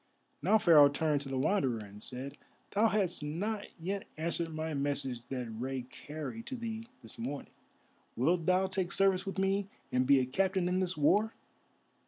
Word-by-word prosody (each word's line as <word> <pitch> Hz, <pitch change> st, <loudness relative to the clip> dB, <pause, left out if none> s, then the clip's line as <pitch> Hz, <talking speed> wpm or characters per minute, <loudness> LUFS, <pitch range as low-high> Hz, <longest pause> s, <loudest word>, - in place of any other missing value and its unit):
Now 220 Hz, -, +5 dB
Pharaoh 155 Hz, -8 st, +7 dB
turned 145 Hz, 0 st, +1 dB
to 140 Hz, -, -7 dB
the 135 Hz, -, -2 dB
Wanderer 135 Hz, -, +2 dB
and 105 Hz, -1 st, -10 dB
said: 130 Hz, +4 st, -5 dB, 0.4 s
"Thou 210 Hz, +3 st, +4 dB
hast 195 Hz, -7 st, +1 dB
not 200 Hz, +8 st, -3 dB
yet 190 Hz, +4 st, -3 dB
answered 165 Hz, +1 st, -2 dB
my 155 Hz, 0 st, -3 dB
message 140 Hz, -3 st, -1 dB
that 125 Hz, -3 st, -4 dB
Rei 130 Hz, +3 st, -3 dB
carried 155 Hz, -, -7 dB
to 260 Hz, -, -4 dB
thee 230 Hz, -1 st, -5 dB, 0.2 s
this 115 Hz, -, -9 dB
morning. 135 Hz, +5 st, -5 dB, 0.6 s
Wilt 160 Hz, +7 st, +1 dB
thou 185 Hz, +1 st, +4 dB
take 190 Hz, -2 st, -1 dB
service 195 Hz, -1 st, +3 dB
with 195 Hz, -, -4 dB
me 195 Hz, +1 st, +1 dB, 0.2 s
and 125 Hz, 0 st, +2 dB
be 140 Hz, -1 st, +7 dB
a 130 Hz, -, +1 dB
captain 185 Hz, +6 st, +1 dB
in 180 Hz, +1 st, +1 dB
this 185 Hz, -3 st, 0 dB
war?" 205 Hz, +9 st, +3 dB
160 Hz, 175 wpm, -32 LUFS, 135-195 Hz, 0.6 s, Pharaoh